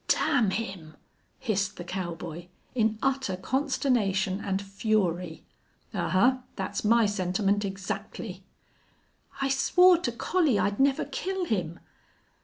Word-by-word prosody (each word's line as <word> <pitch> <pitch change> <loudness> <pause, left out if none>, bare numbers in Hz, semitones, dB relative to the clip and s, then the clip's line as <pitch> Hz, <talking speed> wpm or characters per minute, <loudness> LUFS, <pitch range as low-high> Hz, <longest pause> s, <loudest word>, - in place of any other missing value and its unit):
"Damn 220 -5 +3
him!" 190 -7 -5 0.4
hissed 210 -5 -1
the 175 - -6
cowboy, 175 -2 -5 0.3
in 220 -3 +1
utter 265 -8 0
consternation 205 -5 0
and 195 -1 -1
fury. 195 -4 -1 0.5
"Ahuh! 250 +8 +2
That's 190 -2 -3
my 230 +1 +5
sentiment 200 +1 0
exactly." 195 0 -5 1.0
"I 275 - +1
swore 360 +6 +5
to 260 -9 -1
Collie 290 - +1
I'd 205 0 0
never 270 0 +3
kill 380 -1 -3
him!" 170 - -2
205 Hz, 110 wpm, -28 LUFS, 185-255 Hz, 1.0 s, my